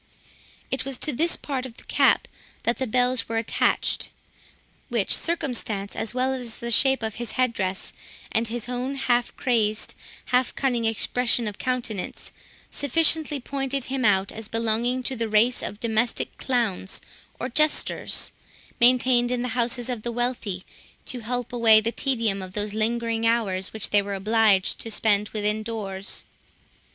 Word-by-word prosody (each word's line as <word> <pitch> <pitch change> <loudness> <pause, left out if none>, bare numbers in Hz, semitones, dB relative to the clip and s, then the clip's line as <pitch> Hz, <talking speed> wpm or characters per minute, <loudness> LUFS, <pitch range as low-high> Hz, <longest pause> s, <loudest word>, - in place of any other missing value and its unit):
It 265 - -1
was 270 -1 -4
to 300 - 0
this 330 +7 +2
part 270 -3 -3
of 250 -3 -8
the - - -12
cap - - +3 0.4
that 235 - 0
the 260 - -1
bells 250 +1 +1
were 225 - -1
attached; 225 -1 +1 0.8
which - - +3
circumstance, 240 -11 -2
as 220 - -2
well 255 +1 0
as 245 -4 -4
the 235 0 -4
shape 265 +1 +4
of 220 -1 -2
his 240 - -2
head 255 -2 +1
dress, 190 -2 -3 0.4
and 230 +1 +1
his 235 0 -4
own 250 +2 -3
half 245 -3 0
crazed, 220 -4 0 0.4
half 250 0 +2
cunning 245 -4 0
expression 230 +1 +2
of 205 - -6
countenance, 240 -6 -3 0.4
sufficiently 305 +1 +3
pointed 270 +1 -2
him 265 0 -2
out 200 -2 +3
as 220 -1 -7
belonging 230 +3 0
to 260 - -1
the 230 -2 -2
race 225 +4 +3
of 205 - -5
domestic 230 0 0
clowns 230 -7 -1 0.4
or - - -2
jesters, 305 0 +1 0.5
maintained 245 0 +4
in 245 -1 -1
the 250 - -2
houses 240 0 0
of 245 -4 -3
the 240 - -3
wealthy, 235 -6 -2 0.4
to 250 - -4
help 245 +1 -3
away 225 -2 +6
the 225 +1 -1
tedium 230 -7 0
of 185 0 -8
those 205 0 -2
lingering 230 +1 0
hours 200 -5 0
which 220 -2 -2
they 205 - +5
were 200 0 -4
obliged 210 -1 +2
to 225 - -5
spend 210 -1 +2
within 210 0 -1
doors. 200 -4 -3
235 Hz, 160 wpm, -25 LUFS, 215-255 Hz, 0.8 s, away